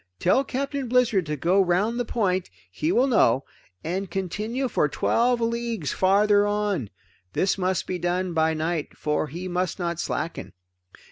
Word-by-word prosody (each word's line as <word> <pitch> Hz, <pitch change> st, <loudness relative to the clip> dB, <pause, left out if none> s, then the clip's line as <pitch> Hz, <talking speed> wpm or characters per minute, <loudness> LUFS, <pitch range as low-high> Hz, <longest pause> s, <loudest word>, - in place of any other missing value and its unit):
Tell 185 Hz, -, +3 dB
Captain 275 Hz, 0 st, -3 dB
Blizzard 230 Hz, -8 st, +2 dB
to 150 Hz, -, -1 dB
go 175 Hz, +7 st, +3 dB
around 190 Hz, +6 st, +1 dB
the 245 Hz, -, -1 dB
point 190 Hz, -6 st, 0 dB, 0.2 s
he 150 Hz, -, -1 dB
will 240 Hz, +7 st, +4 dB
know 135 Hz, -, +3 dB, 0.4 s
and 185 Hz, +3 st, -3 dB
continue 210 Hz, +8 st, -2 dB
for 150 Hz, -10 st, +1 dB
twelve 240 Hz, -, +1 dB
leagues 230 Hz, -7 st, -2 dB
farther 205 Hz, +2 st, +4 dB
on. 205 Hz, -, -1 dB, 0.4 s
This 190 Hz, -, +1 dB
must 185 Hz, -1 st, -1 dB
be 180 Hz, -, -3 dB
done 180 Hz, +1 st, -1 dB
by 160 Hz, 0 st, +2 dB
night, 160 Hz, 0 st, -3 dB
for 150 Hz, 0 st, -1 dB
he 175 Hz, +6 st, -6 dB
must 180 Hz, -1 st, -1 dB
not 170 Hz, -2 st, -2 dB
slacken. 170 Hz, -7 st, -4 dB
185 Hz, 155 wpm, -25 LUFS, 170-230 Hz, 0.4 s, will